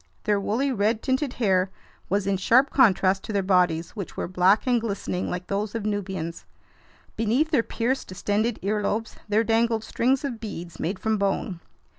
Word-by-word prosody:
Their 205 -1 +2
woolly, 240 +8 0
red 220 -1 0
tinted 260 0 0
hair 190 -5 +2 0.4
was 200 0 +1
in 195 -1 +1
sharp 255 +8 +4
contrast 195 -6 +4
to - - -5
their 200 -1 +1
bodies, 180 -3 +2
which 200 -5 -7
were - - -2
black 185 +3 +3
and 245 -2 +2
glistening 200 -4 -3
like 180 0 -4
those 205 +3 -2
of 220 -2 -3
Nubians. 190 -5 -3 0.7
Beneath 240 +8 +1
their 280 -7 +4
pierced, 240 +3 -2
distended 205 +5 -1
earlobes 210 +2 -1
there 215 +2 +3
dangled 225 0 +1
strings 255 +5 +1
of 245 -5 -4
beads 175 -6 -7
made 185 +4 -2
from 220 0 0
bone. 195 -2 -1
210 Hz, 170 wpm, -25 LUFS, 190-230 Hz, 0.7 s, sharp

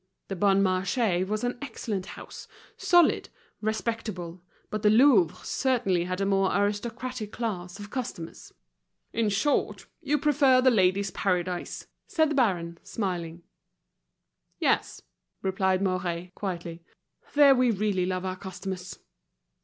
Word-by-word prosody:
The 195 - -3
Bon 195 +1 +3
Marché 185 0 +1
was 215 +3 -2
an 245 0 -2
excellent 210 -8 -4
house, - - -10 0.3
solid, 350 -2 +3 0.3
respectable; 215 -5 -3 0.3
but 215 - -2
the 210 - +4
Louvre 215 - +5
certainly 195 -10 +1
had 185 +1 -3
a 195 - +1
more 195 -1 +2
aristocratic 215 +2 -2
class 185 -6 -4
of 205 0 -9
customers. 225 -10 -6 0.6
"In 225 -2 +1
short, 215 +9 0 0.2
you 295 -2 +1
prefer 280 -3 +4
The 255 0 +5
Ladies' 195 -2 +2
Paradise," 180 -1 -2 0.2
said 315 -2 +2
the - - 0
baron, 175 -9 0
smiling. 175 -5 -4 1.1
"Yes," - - 0 0.4
replied 190 0 +1
Mouret, 180 -2 -2
quietly. 170 -4 -5 0.5
"There 285 -1 +8
we 255 -1 +3
really 200 -4 0
love 185 0 -2
our 185 0 -3
customers." 185 -1 -6
195 Hz, 125 wpm, -27 LUFS, 185-230 Hz, 1.1 s, There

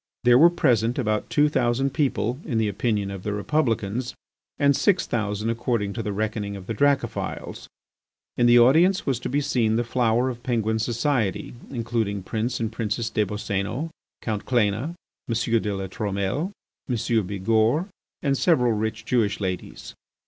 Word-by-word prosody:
There 120 0 +6
were 170 +3 +8
present 125 -9 +1
about 110 -4 -1
two 150 0 +4
thousand 135 -1 +1
people, 125 -5 0
in 120 -7 -2
the 110 -1 +2
opinion 105 -1 -1
of 100 -2 -6
the 105 +2 -3
Republicans, 120 -1 -1 0.4
and 140 -1 +4
six 190 +3 +2
thousand 105 -1 -1
according 115 -4 -1
to 115 - -3
the 105 -1 -3
reckoning 105 0 -2
of 95 -2 -9
the 115 - -3
Dracophils. 135 -1 -1 0.7
In 120 - +3
the 120 0 +7
audience 160 +11 +5
was 135 -4 0
to - - -4
be 140 +3 +1
seen 125 -7 +1
the 120 - +1
flower 120 0 +1
of 120 -1 -9
Penguin 110 -3 0
society, 115 -2 -1 0.2
including 115 -5 -2
Prince 115 +6 -2
and 115 -1 -2
Princess 115 +1 -2
des 105 - +1
Boscénos, 105 - -3 0.3
Count 110 -3 -2
Cléna, 120 +6 +1 0.3
M. 115 0 +1
de 105 - -2
La 95 0 -3
Trumelle, 100 - -2 0.4
M. 125 - +1 0.3
Bigourd, 110 - +1 0.4
and 140 -2 +2
several 130 -6 +3
rich 110 0 -2
Jewish 115 -5 +1
ladies. 95 -3 -5
115 Hz, 160 wpm, -24 LUFS, 105-130 Hz, 0.7 s, were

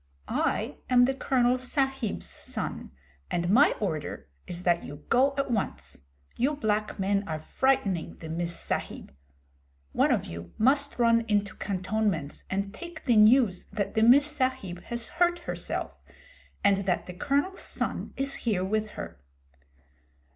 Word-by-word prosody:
'I - - -1
am 245 -1 +6
the 265 - +1
Colonel 255 -2 +2
Sahib's 270 -3 -1
son, - - -3 0.4
and 175 +1 0
my 270 +8 +6
order 160 - -3 0.2
is 175 0 -4
that 175 -1 +2
you 145 +1 -10
go 270 +3 +3
at 275 -2 -1
once. 75 - -3 0.3
You 275 +5 +1
black 215 -6 -1
men 200 +1 +1
are 160 -1 -2
frightening 195 - 0
the 160 - -9
Miss 170 +1 -2
Sahib. - - -4 0.8
One - - +3
of - - +1
you 85 +1 -8
must 280 +5 +2
run 230 -1 +4
into 205 -2 0
cantonments 190 -5 -2
and 195 +1 -2
take 340 +6 -9
the 245 -4 +3
news 215 -2 +5
that 200 -1 -3
the 220 - +1
Miss 255 +6 +7
Sahib 260 -11 -1
has 235 -1 -2
hurt 350 +1 +2
herself, 345 - -5 0.6
and 200 -1 +5
that 180 -2 0
the 180 - -7
Colonel's 285 - -1
son - - -3
is 275 +1 0
here 205 -6 0
with 215 +2 0
her.' 85 -2 -7
215 Hz, 145 wpm, -28 LUFS, 185-265 Hz, 0.8 s, Miss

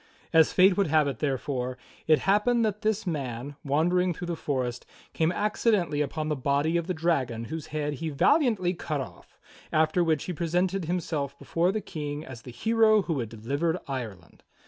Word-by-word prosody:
As 160 -1 +6
fate 185 +1 +5
would 200 - +2
have 155 -1 +3
it 135 -5 -3
therefore, 130 -2 -2 0.3
it 155 -1 +6
hap 205 +2 +3
pened 240 -1 +3
that 210 -1 -1
this 215 -1 0
man, 140 -4 -4
wandering 175 +5 +1
through 175 - -6
the 170 -1 -2
forest, 125 -5 -2 0.3
came 160 +1 +1
accidentally 205 -6 +1
upon 155 +2 -2
the 155 - 0
body 140 +4 +1
of 170 -1 0
the 185 - 0
dragon 140 -9 0
whose 160 -1 -5
head 150 -1 -2
he 160 +3 -4
valiantly 185 - +2
cut 155 -4 -3
off, 135 - -9 0.3
after 155 +3 +3
which 160 -4 +1
he 180 - -4
presented 175 +3 0
himself 155 -5 -2
before 170 +5 0
the 215 +1 -2
King 150 -3 -5
as 120 -4 -9
the 125 - -11
hero 215 - +3
who 165 -6 -2
had 115 -3 -3
delivered 140 +10 -1
Ireland. 110 - -6
160 Hz, 185 wpm, -27 LUFS, 140-180 Hz, 0.3 s, As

